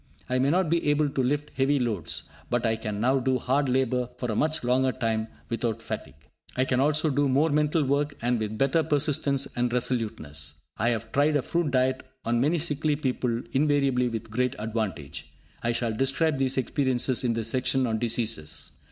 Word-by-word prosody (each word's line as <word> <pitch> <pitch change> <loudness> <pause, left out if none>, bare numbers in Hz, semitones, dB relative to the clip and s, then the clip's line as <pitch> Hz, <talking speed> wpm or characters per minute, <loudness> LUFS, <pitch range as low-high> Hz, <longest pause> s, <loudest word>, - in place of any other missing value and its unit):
I 130 0 0
may 135 +2 +3
not 180 +3 +2
be 165 -1 +1
able 145 0 +3
to 135 - -1
lift 145 +3 -1
heavy 140 +2 +2
loads, 110 - -2 0.3
but 120 -1 0
I 115 0 +2
can 105 -2 -4
now 130 +4 +3
do 130 0 +1
hard 135 +3 +1
labour 125 -1 +1
for 125 -2 -2
a - - -2
much 155 +4 0
longer 130 +2 +2
time 115 -3 -1 0.2
without 115 -1 -2
fatigue. 70 - -6 0.4
I 130 - +2
can 125 -1 +1
also 150 +2 +2
do 140 0 +2
more 145 +5 +3
mental 150 +1 +2
work, 145 +1 0
and 120 0 +1
with 110 0 -3
better 135 +6 +3
persistence 145 -2 +1
and 120 0 0
resoluteness. 90 - -2 0.2
I 115 +3 +1
have 115 -1 -2
tried 145 +2 +3
a 145 - +2
fruit 170 -3 0
diet 130 0 +1 0.2
on 120 0 +1
many 155 +6 +2
sickly 150 -1 0
people, 125 -4 -1
invariably 140 -3 +2
with 115 -1 -5
great 125 +3 0
advantage. 110 -10 -4 0.3
I 120 - +1
shall 115 -1 -1
describe 135 +5 +1
these 135 0 +1
experiences 130 -1 +1
in 120 -2 +1
the 115 - -1
section 130 +3 0
on 110 -2 -1
diseases. 110 -10 -1
130 Hz, 190 wpm, -27 LUFS, 115-145 Hz, 0.4 s, may